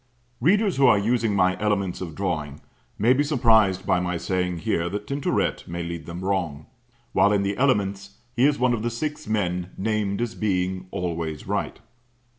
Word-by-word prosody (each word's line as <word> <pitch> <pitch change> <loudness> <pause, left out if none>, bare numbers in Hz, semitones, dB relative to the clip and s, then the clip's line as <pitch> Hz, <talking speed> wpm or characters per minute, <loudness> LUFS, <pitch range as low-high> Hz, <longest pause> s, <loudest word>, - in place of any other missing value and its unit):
Readers 195 - +3
who 135 - +5
are 105 - +6
using 115 0 +1
my 95 -1 +3
Elements 100 -4 0
of 85 -4 -6
Drawing 75 -7 -3 0.4
may 115 +5 +4
be 140 +3 +2
surprised 110 -9 +3
by 95 -2 +2
my 90 -1 -1
saying 90 0 -1
here 85 +1 -1
that 105 +3 -4
Tintoret 140 +4 -1
may 85 0 -4
lead 85 -2 -6
them 85 +1 -6
wrong; 85 -7 -1 0.5
while 100 - +4
in 100 -1 +2
the 100 +1 -1
Elements 100 -6 0 0.2
he 125 +4 +5
is 145 -1 +1
one 125 -1 +2
of 115 - -1
the 120 - -1
six 145 +5 -4
men 90 -4 -1
named 105 -1 -1
as 120 -1 -2
being 95 -3 -1
"always 85 -5 -4
right." 100 +3 -3
100 Hz, 180 wpm, -24 LUFS, 90-115 Hz, 0.5 s, are